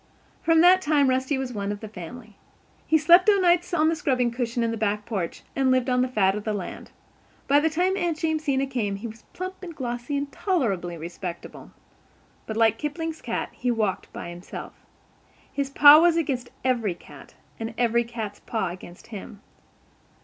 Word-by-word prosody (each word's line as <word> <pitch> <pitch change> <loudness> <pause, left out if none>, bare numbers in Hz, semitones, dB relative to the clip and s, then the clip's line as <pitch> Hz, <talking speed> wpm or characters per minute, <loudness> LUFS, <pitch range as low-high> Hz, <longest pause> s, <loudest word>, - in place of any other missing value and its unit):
From 325 -1 +4
that 365 +2 +6
time 290 -5 +3
Rusty 260 +2 0
was 265 -2 -4
one 200 -2 -3
of 205 - -5
the 220 - -7
family. 215 +3 -10 0.5
He 315 - +5
slept 345 +6 +6
o'nights 355 -3 +3
on 315 -3 +3
the 325 - +2
scrubbing 255 -5 0
cushion 235 0 -2
in 230 - 0
the - - -2
back 210 -1 -1
porch 195 -7 -4
and 270 -1 +2
lived 255 0 +2
on 250 0 +3
the 255 - +2
fat 200 -6 +2
of 210 0 -5
the 215 -1 -2
land. 190 -3 -7 0.6
By 285 +1 +5
the 320 +2 +2
time 360 +4 +1
Aunt 345 -4 -1
Jamesina 310 -4 0
came 235 -7 -2
he 200 +4 -8
was 225 0 -8
plump 370 +1 -6
and 345 -4 -8
glossy 245 +1 -3
and 280 0 -3
tolerably 200 - -1
respectable. 170 +1 -7 0.8
But, 220 - -4
like 225 -1 +3
Kipling's 320 +2 -4
cat, 230 - -3
he 250 - -3
"walked 215 -5 -1
by 170 - -7
himself." 175 +1 -8 0.8
His 280 -1 -2
paw 290 +2 +9
was 340 -1 +4
against 260 -6 -1 0.2
every 230 -8 +1
cat, - - -15 0.2
and 225 0 -5
every 235 0 +2
cat's 225 -3 -6
paw 220 -6 -2
against 175 0 -11
him. 205 0 -8
250 Hz, 185 wpm, -25 LUFS, 215-310 Hz, 0.8 s, paw